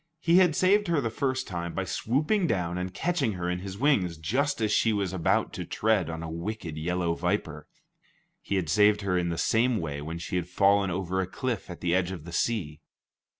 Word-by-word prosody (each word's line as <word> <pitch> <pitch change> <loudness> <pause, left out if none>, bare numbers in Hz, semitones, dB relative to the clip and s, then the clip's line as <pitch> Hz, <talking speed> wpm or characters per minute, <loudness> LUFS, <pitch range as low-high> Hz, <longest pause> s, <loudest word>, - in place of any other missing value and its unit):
He 170 +1 +4
had 180 -4 +5
saved 205 +2 +3
her 170 -3 +2
the 115 -5 -2
first 130 0 -1
time 85 -2 -4
by 95 - -1
swooping 150 - 0
down 90 - -1
and 90 0 -3
catching 150 - 0
her 90 -1 -4
in 90 0 -1
his 95 +1 -7
wings 100 - +2
just 135 - 0
as 110 -2 0
she 115 - +3
was 100 -3 -1
about 90 -3 +1
to - - -4
tread 105 -6 +1
on 80 0 -5
a 80 - -5
wicked 85 -1 -5
yellow 85 +2 -1
viper; 85 -4 -2 0.7
he 100 - -3
had 95 -4 0
saved 105 +5 +4
her 95 -2 0
in 90 -1 0
the 85 - -2
same 115 +7 +2
way 75 -6 -4
when 80 +3 -5
she 85 +2 -3
had 90 -1 -2
fallen 100 +1 +3
over 95 +1 -1
a 95 - -3
cliff 120 +1 -3
at 90 - -8
the 85 -1 +1
edge 90 0 +1
of 85 -5 -7
the 85 - -9
sea. 85 -8 -1
95 Hz, 220 wpm, -27 LUFS, 85-115 Hz, 0.7 s, had